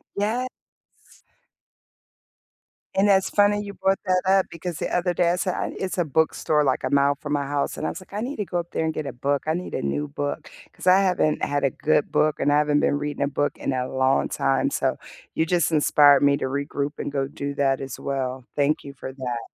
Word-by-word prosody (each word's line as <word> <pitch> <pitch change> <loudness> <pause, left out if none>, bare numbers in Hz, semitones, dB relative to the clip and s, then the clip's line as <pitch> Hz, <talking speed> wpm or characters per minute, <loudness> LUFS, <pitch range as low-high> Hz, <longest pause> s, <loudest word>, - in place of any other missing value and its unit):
Yes. 220 +5 0 2.5
And 195 +2 +3
that's 195 -2 +3
funny 205 0 +3
you 200 -1 -7
brought 195 0 +1
that 185 -1 +2
up, 190 0 +3
because 170 0 -5
the - - -3
other 180 0 +1
day 175 -1 +2
I - - +1
said 185 +1 -1
"I - - -2
nee" - - -9
it's 190 0 -3
a 175 - +3
bookstore 155 0 +1
like 130 -1 0
a 130 - -1
mile 140 0 +3
from 145 0 -5
my 145 -1 +1
house, 140 0 -2
and - - -4
I - - 0
was 185 - -7
like, 185 - -17
"I 205 - -3
need 265 +5 -3
to 210 - -2
go 175 -1 -2
up 170 - -6
there - - -1
and 160 0 -1
get 155 - -4
a - - -5
book, 140 +3 -1
I 155 - +2
need 180 +2 -5
a - - -2
new 70 +1 -2
book." 70 0 -4 0.2
'Cause - - -9
I 185 +1 +7
haven't 180 -5 +1
had 145 0 0
a 135 - +3
good 150 +3 0
book 155 -1 +2
and 145 - +2
I 145 - +4
haven't 150 0 +2
been 145 - +2
reading 145 -1 -3
a - - +1
book 145 +1 -1
in - - -2
a 125 0 -1
long 130 0 +1
time, 65 -1 +1
so, - - -1 0.4
you 160 - +1
just 170 -1 +1
inspired 145 -2 +5
me 140 0 +5
to - - -3
regroup 140 +2 -2
and - - -3
go 135 -1 -1
do 140 0 -5
that 135 -1 +1
as 135 -2 -6
well. 130 -2 -3
Thank 145 +2 +1
you 140 -1 -9
for 130 0 -8
that. 125 -3 -4
145 Hz, 240 wpm, -24 LUFS, 140-180 Hz, 2.5 s, I